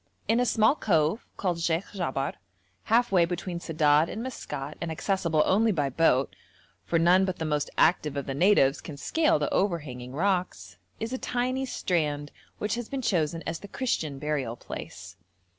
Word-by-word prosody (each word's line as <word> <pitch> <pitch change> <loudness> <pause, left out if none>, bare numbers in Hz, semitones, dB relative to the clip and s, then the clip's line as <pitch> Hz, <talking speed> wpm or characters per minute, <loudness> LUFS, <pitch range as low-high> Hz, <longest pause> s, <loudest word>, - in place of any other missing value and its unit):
In 230 - +3
a 245 - +2
small 220 +2 +4
cove, 170 - +1
called 180 -3 -1
Sheikh 165 +3 -1
Jabar, 140 -8 -2 0.5
half 240 +1 +3
way 180 -3 +5
between 175 0 -3
Sedad 155 -1 +3
and 225 - -5
Maskat, 150 - -6
and 170 -1 -3
accessible 165 -2 +1
only 220 +4 +3
by 145 -7 0
boat 135 -2 +2 0.5
(for 170 - 0
none 175 +3 +5
but 185 -1 -1
the 160 - -3
most 150 -2 -1
active 155 -4 +3
of 140 - -2
the 135 - -3
natives 145 -4 +4
can 150 - -8
scale 315 - +2
the 150 - -2
overhanging 145 -10 -2
rocks), 180 - -1 0.2
is 225 +3 -4
a 260 - -2
tiny 255 +2 -1
strand 150 - -1 0.3
which 210 0 -2
has 235 -1 -4
been 275 -2 -4
chosen 165 -5 0
as 165 - -3
the 205 - -10
Christian 165 - -2
burial 140 -5 -2
place. - - -9
170 Hz, 175 wpm, -27 LUFS, 150-205 Hz, 0.5 s, way